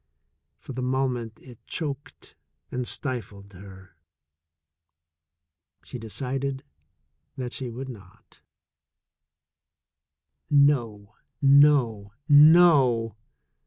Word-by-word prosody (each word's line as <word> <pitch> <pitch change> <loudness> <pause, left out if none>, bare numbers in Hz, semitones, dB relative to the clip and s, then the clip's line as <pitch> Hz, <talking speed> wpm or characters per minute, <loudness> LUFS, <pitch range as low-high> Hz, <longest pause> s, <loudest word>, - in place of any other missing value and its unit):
For 135 - -11
the 130 - -5
mo 130 +1 0
ment 115 -3 -6
it 125 -3 -15
choked 150 -1 -7 0.4
and 125 -1 -4
stifled 105 -7 -6
her. 95 -1 -15 1.9
She 125 - -9
decided 130 +4 -5 0.7
that 125 -2 -6
she 130 -2 -6
would 130 +3 -8
not. 100 -8 -15 2.1
No, 120 -8 +1 0.3
no, 135 -8 +3
no! 145 - +5
125 Hz, 80 wpm, -25 LUFS, 110-140 Hz, 2.1 s, no